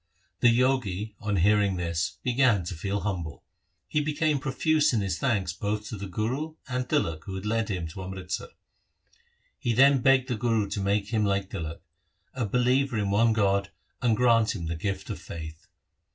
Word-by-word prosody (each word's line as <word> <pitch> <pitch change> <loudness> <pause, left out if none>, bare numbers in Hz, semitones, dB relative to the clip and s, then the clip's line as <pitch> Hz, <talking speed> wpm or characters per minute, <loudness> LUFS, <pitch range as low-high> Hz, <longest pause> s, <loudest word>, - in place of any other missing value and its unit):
3 120 - +6
The 115 - +3
Jogi 110 -6 0
on 105 -1 -1
hearing 100 +1 +3
this 85 -3 -2
began 125 -6 +3
to 85 - -5
feel 100 +4 -2
humble. 85 -8 -4 0.4
He 150 - +1
became 150 0 +1
profuse 150 +2 +2
in 110 - +2
his 95 -3 -2
thanks 105 -10 0
both 105 +3 -3
to - - -5
the 100 -1 -6
Guru 130 - -2
and 125 -1 -3
Tilak 85 - 0
who 95 - -5
had 95 +2 -6
led 110 0 0
him 90 -5 -2
to 95 - -8
Amritsar. 95 0 -5 1.1
He 120 - 0
then 135 +2 +5
begged 130 0 +4
the 125 - -1
Guru 115 -3 +1
to 100 0 -3
make 100 +1 0
him 110 -1 +1
like 100 -1 0
Tilak, 85 -4 -5 0.5
a 125 -5 -2
believer 125 +3 +2
in 100 -1 0
one 115 +3 +4
God, 100 -2 +1 0.3
and 115 -3 +2
grant 115 -3 +3
him 85 -5 -5
the 85 +1 -2
gift 95 +5 -3
of - - -5
faith. 80 -1 -8
105 Hz, 185 wpm, -27 LUFS, 95-125 Hz, 1.1 s, 3